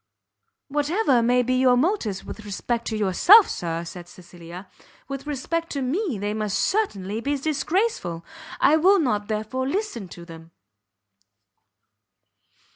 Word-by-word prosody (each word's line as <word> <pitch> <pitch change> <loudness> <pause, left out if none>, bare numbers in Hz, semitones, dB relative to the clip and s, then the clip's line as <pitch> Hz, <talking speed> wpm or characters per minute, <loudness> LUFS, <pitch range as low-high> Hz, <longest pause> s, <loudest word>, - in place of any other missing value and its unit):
"Whatever 295 - +1
may 245 +2 +3
be 255 +1 0
your 255 -1 +4
motives 250 - -1
with - - -8
respect 230 +3 -3
to 220 - -2
yourself, 215 - +6
Sir," 170 0 -4
said 175 0 -10
Cecilia, 175 +1 -12 0.4
"with 275 +1 -7
respect 330 +4 -3
to 280 -2 -2
me 305 - -1
they 205 +1 -2
must 215 -2 -2
certainly 215 - -1
be 285 +3 -1
disgraceful; 290 - -1 0.3
I 305 +3 +5
will 380 +5 +5
not, 210 - 0
therefore, 220 +5 -3
listen 325 - -3
to 175 -1 -11
them." 165 -1 -12
245 Hz, 130 wpm, -24 LUFS, 195-300 Hz, 0.4 s, yourself